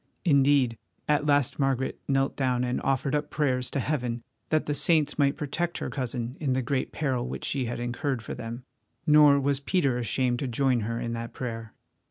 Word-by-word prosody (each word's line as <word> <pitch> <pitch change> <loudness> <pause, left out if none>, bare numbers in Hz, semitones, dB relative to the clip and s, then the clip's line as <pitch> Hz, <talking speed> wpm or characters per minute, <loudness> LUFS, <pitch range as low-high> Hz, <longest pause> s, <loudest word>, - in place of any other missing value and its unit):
Indeed, 140 -6 +4 0.3
at 150 0 +2
last 145 -2 +2
Margaret 135 -1 0
knelt 135 0 +1
down 125 -2 +1
and 125 0 -1
offered 135 0 0
up 150 0 0
prayers 130 -4 0
to - - -2
Heaven 125 -3 -2 0.3
that 155 -1 +2
the 150 - -1
saints 150 -1 +2
might 140 0 +3
protect 170 +3 -2
her - - -4
cousin 125 -2 -3
in 140 -4 0
the 130 0 0
great 130 +1 -1
peril 130 -5 -1
which - - -5
she 135 -3 -1
had 120 +1 -4
incurred 120 +1 -2
for - - -5
them, 115 +2 -6 0.4
nor 150 -2 +7
was 140 0 0
Peter 140 -4 +1
ashamed 120 +1 0
to 135 - -2
join 125 +1 +2
her 115 +2 -2
in 115 0 -3
that 115 0 -5
prayer. 115 -3 -5
135 Hz, 195 wpm, -27 LUFS, 120-145 Hz, 0.4 s, nor